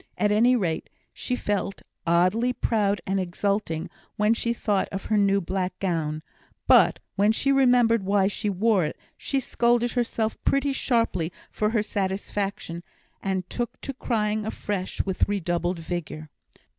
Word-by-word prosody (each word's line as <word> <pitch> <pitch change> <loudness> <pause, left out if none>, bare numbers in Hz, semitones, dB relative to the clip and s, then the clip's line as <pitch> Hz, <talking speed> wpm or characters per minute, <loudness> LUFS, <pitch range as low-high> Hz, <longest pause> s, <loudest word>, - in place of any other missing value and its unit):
At 210 - +2
any 235 +4 +5
rate, 175 -9 -1 0.2
she 250 - -3
felt 205 -4 -2 0.2
oddly 185 +9 +3
proud 205 -6 0
and 195 +1 0
exulting 185 -2 -1 0.3
when 210 +2 +3
she 235 0 -1
thought 210 -4 0
of 195 0 -5
her 215 - +1
new 200 0 +3
black 185 0 -3
gown; 160 -5 -2 0.4
but - - +6 0.2
when 205 +2 +4
she 275 +5 +1
remembered 245 -4 +4
why 195 0 +2
she 205 +1 -1
wore 200 0 +2
it, 150 - -3 0.2
she 275 - -1
scolded 240 -1 +1
herself 230 -2 -1
pretty 275 0 +2
sharply 230 -11 0 0.2
for 210 - 0
her 220 -2 +1
satisfaction, 195 -3 -3 0.4
and 190 -2 -2
took 240 +4 -4
to 275 - -4
crying 215 -4 -1
afresh 205 -3 -3
with 190 0 0
redoubled 175 -2 -1
vigour. 160 -3 -5
205 Hz, 145 wpm, -25 LUFS, 185-230 Hz, 0.4 s, but